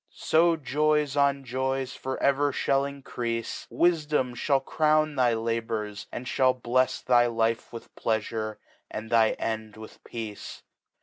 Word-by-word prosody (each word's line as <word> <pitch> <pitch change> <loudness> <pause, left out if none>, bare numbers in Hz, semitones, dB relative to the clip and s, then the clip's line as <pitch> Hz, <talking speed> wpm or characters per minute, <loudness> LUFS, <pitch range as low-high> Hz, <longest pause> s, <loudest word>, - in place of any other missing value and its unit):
So 165 +1 +3
Joys 150 0 +1
'on 140 -1 +2
Joys 130 +1 -2
for 130 0 -4
ever 140 +1 +3
fhall 140 +1 +1
increafe, 120 -4 -4
Wifdom 150 -6 +2
fhall 135 +2 0
Crowni 155 -1 +2
thy 125 -3 +3
Labors, 110 -2 -3
and 125 - -6
fhallblefs 130 0 +1
Thy 120 -1 +5
life 115 -1 0
with 115 - -10
Pleafufe, 110 -1 -2 0.3
and 110 +1 -7
thy 115 -2 +4
End 110 -1 -4
with 110 0 -12
Peace. 110 -3 -7
130 Hz, 130 wpm, -27 LUFS, 115-140 Hz, 0.3 s, Thy